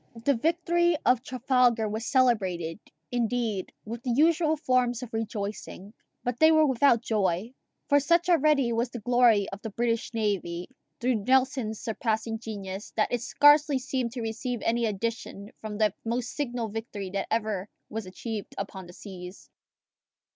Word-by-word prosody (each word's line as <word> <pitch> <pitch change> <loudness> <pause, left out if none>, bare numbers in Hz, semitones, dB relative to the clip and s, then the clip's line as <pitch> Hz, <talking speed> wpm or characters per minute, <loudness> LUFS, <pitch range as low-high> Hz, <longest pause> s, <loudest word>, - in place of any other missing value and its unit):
The 280 - +4
victory 340 +5 +2
of 250 -1 +4
Trafalgar 250 -3 +2
was 220 +2 -4
celebrated, 195 - +1 0.3
indeed, 235 -4 -1
with 230 +2 -6
the 255 - -4
usual 315 +4 +3
forms 250 -3 +1
of 235 - -9
rejoicing, 210 -2 -5 0.3
but 245 0 -2
they 315 0 +7
were 315 -1 +5
without 260 -3 +3
joy; 205 0 0 0.3
for 285 - +5
such 340 +5 +2
already 300 -7 +3
was 230 +2 0
the 240 - -7
glory 235 -3 +4
of 195 +1 -8
the 225 - -5
British 230 +2 -1
navy, 185 -5 -2 0.3
through 240 -4 0
Nelson's 260 -4 +2
surpassing 225 0 -2
genius, 200 -3 -6
that 215 - +1
it 245 - 0
scarcely 290 +2 +5
seemed 255 -2 -2
to 250 - -4
receive 230 +2 -3
any 235 0 +1
addition 215 -1 -4
from 215 -1 -5
the 210 -2 +2
most 235 +1 -2
signal 245 -5 -3
victory 205 -3 -5
that 195 0 -2
ever 215 -3 -1 0.2
was 220 -3 -5
achieved 210 +2 -6
upon 190 -2 -6
the 175 - -12
seas. 180 -1 -10
230 Hz, 155 wpm, -27 LUFS, 210-255 Hz, 0.3 s, they